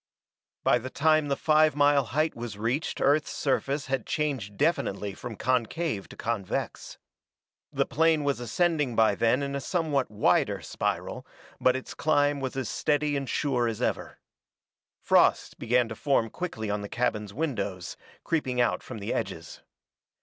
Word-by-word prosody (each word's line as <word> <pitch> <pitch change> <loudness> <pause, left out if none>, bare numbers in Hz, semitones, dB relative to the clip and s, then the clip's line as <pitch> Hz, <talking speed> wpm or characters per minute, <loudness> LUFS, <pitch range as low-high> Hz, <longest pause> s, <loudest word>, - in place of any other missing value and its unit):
By 125 - +4
the 130 +2 -6
time 155 +2 +2
the 140 - +1
five 155 0 +3
mile 145 -2 +4
height 155 +7 0
was 115 -3 -6
reached 120 +8 -2
Earth's 145 +2 +3
surface 140 +1 -1
had 130 -3 -2
changed 130 -10 -2
definitely 100 - 0
from 115 +4 -7
concave 125 - -1
to - - -11
convex. 110 -5 -3 0.7
The - - +1
plane 160 0 +2
was 140 -3 0
ascending 145 +2 0
by 110 -2 +4
then 115 +6 +2
in 140 0 -3
a 140 - -2
somewhat 155 -7 0
wider 105 0 +2
spiral, - - -3 0.3
but 130 0 +3
its 130 - -5
climb 145 -2 +2
was 130 -1 -4
as 130 -4 -2
steady 150 +3 0
and 135 -2 -3
sure 125 -5 +1
as 115 -2 -3
ever. - - -2 0.9
Frost - - +3
begin 120 +1 +2
to 110 - -5
form 125 -5 +1
quickly 110 -13 -4
on 105 0 -1
the 100 - -6
cabin's 105 -4 -1
windows, 100 - -3 0.3
creeping 130 -7 -1
out 120 - +2
from 130 - -8
the 105 +2 -3
edges. 95 -7 -5
130 Hz, 155 wpm, -27 LUFS, 110-145 Hz, 0.9 s, By